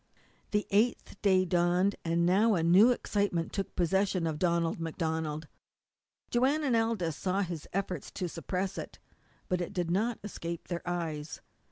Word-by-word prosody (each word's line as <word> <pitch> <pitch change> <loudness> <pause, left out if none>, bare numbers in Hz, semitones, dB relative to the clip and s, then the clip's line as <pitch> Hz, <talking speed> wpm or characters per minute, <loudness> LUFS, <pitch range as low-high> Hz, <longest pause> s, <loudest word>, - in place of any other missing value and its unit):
The 210 0 0
eighth 210 0 +1
day 190 -2 +4
dawned, 180 +2 +2
and 170 +1 +1
now 205 +5 +4
a 165 - +1
new 185 +8 +7
excitement 200 -8 0
took 195 - -3
possession 185 0 +1
of 155 -2 -2
Donald 170 -2 +1
MacDonald. 160 -2 -2 0.8
Joanne 270 +6 +2
and 260 -5 +2
Aldous 225 -9 0
saw 190 +4 0
his 175 -5 -4
efforts 185 -5 -3
to 180 - -2
suppress 185 +3 -3
it, - - -8 0.5
but 180 -1 0
it 175 - -4
did 175 -3 -1
not 220 +5 +1
escape 170 -5 -6
their 175 -1 -2
eyes. 160 -4 -3
180 Hz, 155 wpm, -30 LUFS, 170-200 Hz, 0.8 s, new